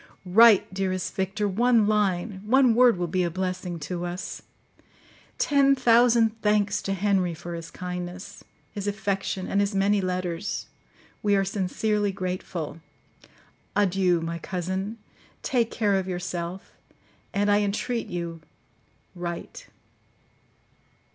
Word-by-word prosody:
Write, 210 +1 +6
dearest 185 -1 -2
Victor,—one 210 +4 +2
line—one 210 +4 +2
word 245 -3 +5
will 175 - -1
be 180 +2 0
a 175 - +1
blessing 185 0 -3
to 175 +3 -5
us. 175 +1 -5 1.0
Ten 275 -1 +4
thousand 235 -3 +4
thanks 210 -1 +2
to 195 - -2
Henry 190 -3 +1
for 175 +1 -7
his 165 -1 -6
kindness, 180 0 -7 0.3
his 205 -1 -5
affection, 195 -2 -2
and 200 - +1
his 200 0 -1
many 200 +1 +3
letters; 180 0 -3 0.6
we 205 -1 +3
are 195 0 +2
sincerely 205 +2 0
grateful. 180 -4 -5 0.9
Adieu! 190 -3 +2
my 165 +1 -4
cousin; 190 +5 -3 0.5
take 235 -3 +1
care 210 -4 +1
of 190 -1 0
yourself; 180 0 -4 0.6
and, 205 +1 +1
I 205 - +4
entreat 220 +4 -2
you, 170 -2 -5 0.7
write! 175 -2 -6
195 Hz, 115 wpm, -26 LUFS, 180-210 Hz, 1.0 s, Write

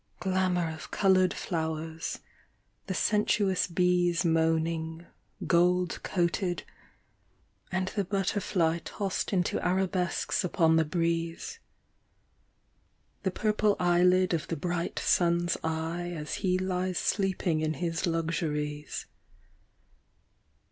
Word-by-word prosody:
Glamour 185 -2 +1
of 160 - -9
coloured 185 -2 +3
flower?, 160 -2 -3 0.9
the 190 - -1
sensuous 210 -2 +2
bees 180 0 +2
Moaning, 160 0 0 0.4
gold 180 +1 +2
coated, 175 0 -1 1.1
and 185 0 0
the 205 - -1
butterfly 185 -3 0
Tossed 195 -2 -3
into 180 -3 0
arabesques 185 +1 0
upon 165 -2 +3
the 160 - +3
breeze. 165 - -2 1.6
The 190 - 0
purple 210 +1 +1
eyelid 180 +1 +4
of 165 -1 -1
the 165 - -3
bright 175 +2 -2
sun's 170 0 +2
eye 165 +2 -2
As 150 0 -5
he 185 -1 +2
lies 185 -1 -1
sleeping 190 -5 0
in 155 0 0
his 165 +3 -1
luxuries 150 -3 -2
175 Hz, 100 wpm, -29 LUFS, 165-185 Hz, 1.6 s, eyelid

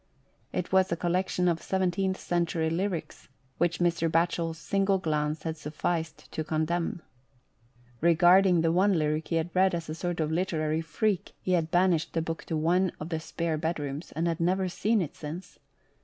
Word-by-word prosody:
It 180 - -3
was 190 0 +3
a - - +2
collection 180 +1 0
of 170 -1 +2
17th 190 +1 0
century 170 -2 0
lyrics, 175 -4 -3 0.3
which 175 -1 +2
Mr. 170 -1 +1
Batchel's 165 0 0
single 195 +3 +1
glance 155 -3 -1
had 160 -1 -3
suf&ced 160 +2 -3
to 155 - -3
condemn. 165 +2 -1 1.0
Regarding 175 +2 +5
the 165 0 +2
one 190 +2 +3
lyric 155 0 0
he 165 - -1
had 165 +1 -1
read 185 -1 +3
as 165 -2 -5
a - - -2
sort 175 +1 -3
of 155 -1 0
literary 160 -2 0
freak, 175 +5 -1
he 185 - -3
had 165 -3 +2
banished 175 -2 +2
the 165 - +1
book 165 0 -4
to 160 - -2
one 175 +4 +2
of 155 - -6
the 160 -2 -2
spare 165 0 -2
bedrooms, 150 -2 -3
and 165 +2 -1
had 165 -1 -1
never 185 +3 +1
seen 210 +3 +1
it 150 - -7
since. 165 +5 -8
170 Hz, 175 wpm, -28 LUFS, 160-180 Hz, 1.0 s, Regarding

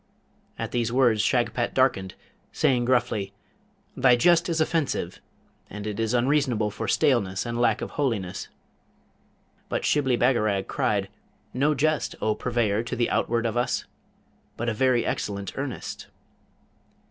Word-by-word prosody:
At - - -4
these 120 -1 0
words 120 -4 +3
Shagpat 120 +1 0
darkened, 100 -9 +1 0.4
saying 125 -2 +2
gruffly, 120 -6 0 0.6
'Thy 125 -1 +5
jest 170 +7 +3
is 165 -1 0
offensive, 155 -2 -1 0.5
and 105 +1 -7
it 105 -1 -4
is 115 +2 0
unseasonable 125 -4 +1
for - - -5
staleness 115 -11 +1
and 120 0 -2
lack 115 -3 +2
of - - -5
holiness.' 105 -10 -2 1.2
But - - -2
Shibli 130 -4 +2
Bagarag 110 -6 +2
cried, 100 -2 0 0.5
'No 145 +4 +2
jest, 155 +1 0
O 110 - +1
purveyor 115 -3 0
to 120 +2 -4
the 120 -1 0
outward 120 0 0
of 115 0 -1
us! 120 +1 0 0.7
but 120 - -3
a - - -1
very 125 +1 +2
excellent 100 -2 -3
earnest.' - - -5
120 Hz, 135 wpm, -25 LUFS, 105-130 Hz, 1.2 s, Thy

